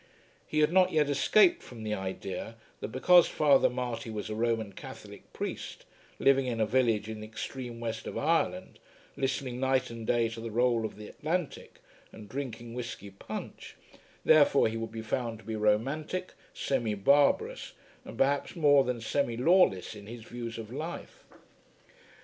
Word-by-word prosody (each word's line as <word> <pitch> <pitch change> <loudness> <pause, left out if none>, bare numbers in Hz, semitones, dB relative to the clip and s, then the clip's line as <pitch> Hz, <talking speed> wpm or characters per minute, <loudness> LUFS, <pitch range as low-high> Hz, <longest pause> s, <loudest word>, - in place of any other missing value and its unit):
He 155 - +1
had 150 +3 +3
not 185 -1 +5
yet 150 -2 +2
escaped 180 +7 +4
from 115 -3 -10
the 105 -1 -2
idea 95 +2 -5 0.2
that - - -4
because 170 +10 +5
Father 145 -3 +4
Marty 125 0 -4
was 110 -1 -5
a - - -1
Roman 110 -2 -1
Catholic - - -11
priest, - - -6 0.3
living 135 -1 +3
in 115 -2 -2
a 110 - +3
village 115 -2 +1
in 110 -1 -6
the 110 - -8
extreme 115 +2 -6
west 115 -1 -4
of - - -5
Ireland, - - 0 0.4
listening 135 -2 -2
night 130 -1 +1
and 115 -1 -7
day 120 -1 +2
to 115 0 -8
the 115 - -5
roll 120 0 +2
of - - -6
the 105 0 -9
Atlantic 165 +1 -4 0.3
and 105 -2 -11
drinking 120 -2 -6
whisky 120 -5 -6
punch, 95 - -8 0.5
therefore 145 -4 +6
he 110 - -5
would 115 0 -4
be 110 0 -6
found 115 0 -2
to 110 - -17
be 110 - -4
romantic, 135 +12 0 0.2
semi 120 -6 -1
barbarous, 140 +8 +2 0.3
and - - -10
perhaps 140 +5 +1
more 145 -4 +5
than 125 -2 -3
semi 120 0 -1
lawless 130 - +3
in 105 -1 -11
his 115 0 -9
views 120 0 -6
of 115 +1 -8
life. 170 - -7
120 Hz, 165 wpm, -30 LUFS, 110-140 Hz, 0.5 s, therefore